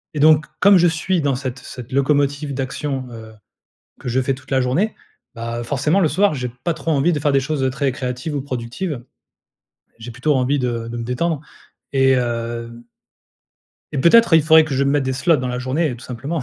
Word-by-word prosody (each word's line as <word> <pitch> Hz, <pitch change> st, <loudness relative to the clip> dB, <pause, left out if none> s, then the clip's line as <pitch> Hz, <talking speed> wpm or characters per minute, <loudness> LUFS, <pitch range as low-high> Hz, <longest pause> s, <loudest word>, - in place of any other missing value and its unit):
et -, -, -2 dB
donc, 150 Hz, 0 st, +5 dB
comme 200 Hz, 0 st, +6 dB
je 175 Hz, -, +5 dB
suis 165 Hz, +2 st, 0 dB
dans 140 Hz, -2 st, +1 dB
cette 130 Hz, 0 st, -5 dB
cette 125 Hz, 0 st, -10 dB
locomotive 140 Hz, +1 st, +1 dB
d'action, 135 Hz, 0 st, -3 dB
heu, 110 Hz, -1 st, -10 dB, 0.7 s
que -, -, -6 dB
je 125 Hz, +2 st, +1 dB
fais 135 Hz, +1 st, 0 dB
toute 130 Hz, 0 st, -16 dB
la 135 Hz, -, +3 dB
journée. 155 Hz, +13 st, 0 dB, 0.4 s
Bah 115 Hz, 0 st, -4 dB
forcément 145 Hz, +9 st, +1 dB
le 165 Hz, -, +3 dB
soir, 190 Hz, +3 st, +2 dB
j'ai 125 Hz, -3 st, -4 dB
pas 170 Hz, -, 0 dB
trop 160 Hz, -, -2 dB
envie 150 Hz, +4 st, +2 dB
de 150 Hz, -, 0 dB
faire 145 Hz, 0 st, +1 dB
des 135 Hz, -, +3 dB
choses 135 Hz, -1 st, -1 dB
très 140 Hz, 0 st, 0 dB
créatives 125 Hz, +4 st, -4 dB
ou -, -, -1 dB
productives. 130 Hz, +2 st, -5 dB, 0.9 s
J'ai 115 Hz, +1 st, -8 dB
plutôt 145 Hz, +6 st, 0 dB
envie 135 Hz, +2 st, +1 dB
de 120 Hz, -3 st, -2 dB
de 120 Hz, -, -6 dB
me 115 Hz, -, -4 dB
détendre 140 Hz, +6 st, -1 dB, 0.5 s
et 135 Hz, -1 st, +3 dB
hem 115 Hz, -1 st, -3 dB, 1.1 s
et 145 Hz, -, -2 dB
peut-être, 180 Hz, -, +5 dB
il 160 Hz, -, +6 dB
faudrait 160 Hz, +1 st, +6 dB
que 150 Hz, -3 st, -4 dB
je 135 Hz, +1 st, +1 dB
me 140 Hz, -, +2 dB
mette 145 Hz, -1 st, +1 dB
des 130 Hz, -, -1 dB
slots 145 Hz, +6 st, +2 dB
dans 130 Hz, -2 st, -3 dB
la 125 Hz, 0 st, -3 dB
journée 130 Hz, +3 st, -1 dB
tout 120 Hz, -, -13 dB
simplement 140 Hz, +6 st, -4 dB
135 Hz, 210 wpm, -20 LUFS, 125-155 Hz, 1.1 s, comme